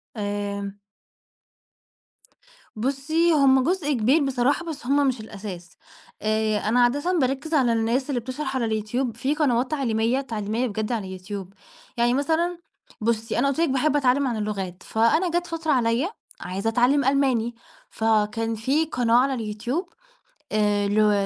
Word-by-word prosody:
آآ 205 Hz, -1 st, -3 dB, 2.0 s
بُصّي، 280 Hz, +8 st, +1 dB
هُم 270 Hz, -3 st, +5 dB
جزء 330 Hz, -1 st, 0 dB
كبير 260 Hz, +6 st, +3 dB
بصراحة، 270 Hz, +5 st, +1 dB
بس 300 Hz, -5 st, -7 dB
هُم 280 Hz, +2 st, +3 dB
مش 255 Hz, -2 st, 0 dB
الأساس 195 Hz, -5 st, -9 dB, 0.4 s
آآ 215 Hz, 0 st, +1 dB
أنا 225 Hz, +4 st, +2 dB
عادةً 290 Hz, +9 st, +1 dB
باركز 270 Hz, +4 st, -1 dB
على 255 Hz, -6 st, +3 dB
الناس 230 Hz, +5 st, 0 dB
اللي 265 Hz, -4 st, 0 dB
بتشرح 265 Hz, +3 st, -4 dB
على 250 Hz, -3 st, 0 dB
اليوتيوب 220 Hz, +3 st, -2 dB
في 275 Hz, +5 st, 0 dB
قنوات 260 Hz, -3 st, +1 dB
تعليمية 240 Hz, -3 st, +1 dB
تعليمية 225 Hz, -1 st, -2 dB
بجد 215 Hz, +1 st, -3 dB
على 225 Hz, -4 st, -2 dB
اليوتيوب. 190 Hz, +1 st, -7 dB, 0.4 s
يعني 240 Hz, +1 st, +3 dB
مثلًا 325 Hz, +6 st, 0 dB, 0.4 s
بُصّي، 225 Hz, +1 st, 0 dB
أنا 275 Hz, -, +3 dB
قُلت 275 Hz, +2 st, -1 dB
لِك 335 Hz, -2 st, +2 dB
باحب 270 Hz, +3 st, +1 dB
أتعلم 275 Hz, 0 st, +3 dB
عن 235 Hz, -3 st, -2 dB
اللغات، 195 Hz, -4 st, -4 dB
فأنا 315 Hz, +11 st, +2 dB
جات 345 Hz, 0 st, 0 dB
فترة 330 Hz, -2 st, -2 dB
عليا 245 Hz, +4 st, +2 dB, 0.3 s
عايزة 195 Hz, +5 st, -2 dB
أتعلم 250 Hz, +5 st, +3 dB
ألماني، 260 Hz, -4 st, +1 dB, 0.3 s
فكان 225 Hz, +1 st, 0 dB
في 270 Hz, +9 st, +1 dB
قناة 245 Hz, -6 st, +1 dB
على 265 Hz, +2 st, +3 dB
اليوتيوب 240 Hz, -, -3 dB, 0.6 s
آآ 205 Hz, -1 st, +2 dB
لو 210 Hz, +1 st, +3 dB
245 Hz, 145 wpm, -24 LUFS, 215-280 Hz, 2.0 s, هُم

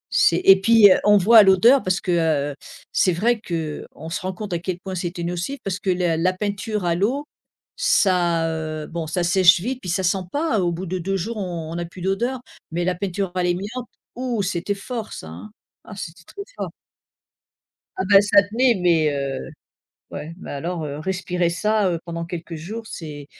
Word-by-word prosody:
C'est 170 Hz, +1 st, +4 dB
et 195 Hz, 0 st, +8 dB
puis, 220 Hz, -1 st, +7 dB
heu, -, -, +4 dB
on 210 Hz, 0 st, +6 dB
voit 220 Hz, +4 st, +7 dB
à -, -, +9 dB
l'odeur 220 Hz, +8 st, +6 dB
parce 185 Hz, -1 st, 0 dB
que, 180 Hz, -, -2 dB, 0.4 s
heu, -, -, -9 dB, 0.4 s
c'est 185 Hz, -, +2 dB
vrai 225 Hz, +7 st, +1 dB
que, 160 Hz, -6 st, -4 dB
on 160 Hz, -, -8 dB
se 185 Hz, -, -2 dB
rend 185 Hz, -, -3 dB
compte 205 Hz, +1 st, -7 dB
à 170 Hz, -, -1 dB
quel 175 Hz, +1 st, -4 dB
point 190 Hz, 0 st, -7 dB
c'était 175 Hz, 0 st, -4 dB
nocif 175 Hz, +10 st, -3 dB
parce 185 Hz, -2 st, -3 dB
que 190 Hz, -, -3 dB
la 175 Hz, -3 st, +1 dB
la 180 Hz, +3 st, +2 dB
peinture 205 Hz, +2 st, -3 dB
à 170 Hz, -, +2 dB
l'eau, 235 Hz, -, 0 dB, 0.5 s
ça, 180 Hz, -, +2 dB
heu, 155 Hz, -1 st, -4 dB
bon 165 Hz, -1 st, -5 dB
ça 175 Hz, +3 st, -1 dB
sèche 175 Hz, 0 st, +5 dB
vite 250 Hz, +7 st, -3 dB
puis 180 Hz, -, -6 dB
ça 190 Hz, +2 st, 0 dB
sent 185 Hz, +2 st, +2 dB
pas 295 Hz, -6 st, 0 dB
au 175 Hz, -1 st, +1 dB
bout 175 Hz, +3 st, -5 dB
de 185 Hz, +1 st, -3 dB
2 195 Hz, +3 st, -1 dB
jours 220 Hz, +5 st, -4 dB
on 170 Hz, -5 st, -4 dB
on -, -, -5 dB
n'a 170 Hz, 0 st, -3 dB
plus 175 Hz, +2 st, -12 dB
d'odeur, 235 Hz, +8 st, -1 dB, 0.3 s
mais 175 Hz, +1 st, -1 dB
la 185 Hz, -, +1 dB
peinture 190 Hz, +1 st, -3 dB
à 180 Hz, -, -1 dB
l'amiante, 200 Hz, +8 st, -3 dB, 0.3 s
ouh, 245 Hz, -4 st, -2 dB
c'était 185 Hz, +2 st, -2 dB
fort 225 Hz, +2 st, -6 dB
ça, 80 Hz, -, -8 dB
hein, 90 Hz, +7 st, -10 dB, 0.3 s
ah 210 Hz, -, -11 dB
c'était 170 Hz, -2 st, -8 dB
très 400 Hz, -, -8 dB
fort. -, -, -4 dB, 1.3 s
Ah -, -, +1 dB
ben, 195 Hz, -1 st, +9 dB
ça 205 Hz, 0 st, +5 dB
tenait 235 Hz, +5 st, +2 dB
mais, 170 Hz, -4 st, +3 dB
heu, 140 Hz, -, -3 dB, 0.6 s
ouais, 155 Hz, +2 st, -6 dB
mais -, -, -8 dB
alors, 165 Hz, +3 st, -4 dB
heu, 145 Hz, 0 st, -5 dB
respirer 180 Hz, 0 st, -1 dB
ça, 210 Hz, +3 st, +1 dB
heu, 170 Hz, -, -1 dB
pendant 170 Hz, -1 st, -5 dB
quelques 170 Hz, 0 st, -7 dB
jours 210 Hz, +9 st, -7 dB
c'est, 150 Hz, -7 st, -8 dB
185 Hz, 210 wpm, -22 LUFS, 170-205 Hz, 1.3 s, à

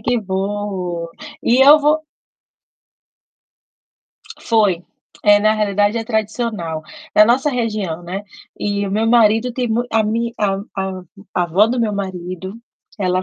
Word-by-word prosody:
que 240 Hz, +3 st, 0 dB
bom! 190 Hz, -3 st, -3 dB, 0.3 s
E 240 Hz, +2 st, +3 dB
eu 295 Hz, +2 st, +9 dB
vou 300 Hz, +1 st, +3 dB, 2.4 s
Foi. 205 Hz, -7 st, +1 dB, 0.4 s
É, 205 Hz, -1 st, +6 dB
na 215 Hz, +1 st, +4 dB
realidade, 205 Hz, 0 st, +1 dB
é 225 Hz, -, -2 dB
tradicional. 220 Hz, -7 st, -2 dB, 0.3 s
Na 210 Hz, -, +8 dB
nossa 250 Hz, +6 st, +2 dB
região, 215 Hz, -, -2 dB
né, 185 Hz, +3 st, -5 dB, 0.4 s
e 205 Hz, 0 st, -1 dB
o -, -, -4 dB
meu 215 Hz, +3 st, 0 dB
marido 225 Hz, +1 st, +3 dB
tem 245 Hz, 0 st, -2 dB
mui 235 Hz, +2 st, 0 dB
a 225 Hz, 0 st, +3 dB
mi 230 Hz, +2 st, -1 dB
a 200 Hz, -2 st, +1 dB, 0.2 s
a 190 Hz, -1 st, -3 dB, 0.3 s
a 180 Hz, -, +2 dB
avó 180 Hz, +5 st, +3 dB
do 245 Hz, +2 st, -1 dB
meu 220 Hz, -2 st, 0 dB
marido, 185 Hz, -1 st, -5 dB, 0.4 s
ela 185 Hz, -2 st, 0 dB
210 Hz, 140 wpm, -18 LUFS, 190-230 Hz, 2.4 s, eu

